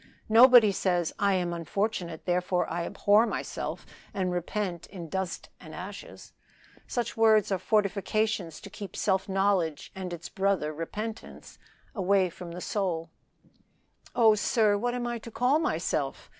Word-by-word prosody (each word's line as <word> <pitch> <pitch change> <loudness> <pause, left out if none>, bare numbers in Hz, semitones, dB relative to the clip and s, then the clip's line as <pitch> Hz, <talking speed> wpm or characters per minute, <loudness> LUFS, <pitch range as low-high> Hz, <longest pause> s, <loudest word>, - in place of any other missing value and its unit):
Nobody 235 -1 +8
says, 180 -3 0
'I 200 -1 +3
am 175 -2 -1
unfortunate, 170 0 -3
therefore 180 0 0
I 170 0 -3
abhor 210 +3 +3
myself - - -4 0.3
and 185 -2 0
repent 180 0 -3
in 175 -5 -9
dust 190 0 -4
and - - -11
ashes.' - - -9 0.5
Such 240 -2 -2
words 220 -2 +4
are 190 - +1
fortifications 205 -3 0
to 200 - -11
keep 205 -2 -8
self 190 -1 0
knowledge 190 -6 0
and 185 -2 -6
its 175 0 -6
brother 195 -6 0
repentance 210 +8 -7 0.3
from 185 -3 0
the 175 +1 -7
soul." 170 -6 -2 1.0
"Oh, 225 -3 +6
sir! 210 0 +2
what 240 +4 -1
am 245 -1 -3
I 240 -1 -3
to 230 - -10
call 250 +6 +2
myself?" 160 - -2
195 Hz, 140 wpm, -28 LUFS, 175-215 Hz, 1.0 s, Nobody